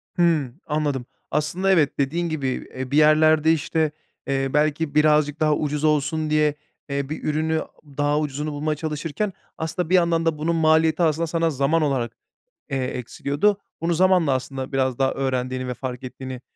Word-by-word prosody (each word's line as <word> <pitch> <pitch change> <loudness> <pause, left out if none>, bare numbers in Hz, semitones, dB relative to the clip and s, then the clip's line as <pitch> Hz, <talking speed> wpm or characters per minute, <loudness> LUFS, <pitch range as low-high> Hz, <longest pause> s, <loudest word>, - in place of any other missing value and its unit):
Hımm, 160 -6 +1
anladım. 145 -4 -1 0.3
Aslında 170 +6 +1
evet, 155 -7 +2
dediğin 165 +5 0
gibi, 150 -4 -2 0.3
eee, 130 0 -5
bir 145 - +2
yerlerde, 155 +1 +5
işte, 160 0 0 0.4
eee, 135 0 0
belki 150 0 +1
birazcık 150 0 +3
daha 155 -1 +3
ucuz 150 0 -2
olsun 155 +1 +1
diye, 150 -1 +2 0.3
eee, 140 0 -2
bir 155 - -5
ürünü 160 +1 0 0.4
daha 145 +1 +2
ucuzunu 150 0 -3
bulmaya 150 +1 -1
çalışırken 160 +6 -3 0.2
aslında 160 +1 -3
bir 185 - +4
yandan 170 -2 +3
da 165 -2 +1
bunun 165 +3 0
maliyeti 160 +1 +3
aslında 165 +1 +1
sana 165 0 +1
zaman 145 +3 +1
olarak, 130 -6 0 0.6
eee, 135 -2 -1
eksiliyordu. 140 - -1 0.2
Bunu 170 +1 +1
zamanla 180 -3 +3
aslında 130 +1 -4
biraz 130 -2 0
daha 135 0 +2
öğrendiğini 130 -1 -2
ve 125 - -2
fark 125 0 -6
ettiğini, 130 0 -7
150 Hz, 165 wpm, -23 LUFS, 135-160 Hz, 0.6 s, yerlerde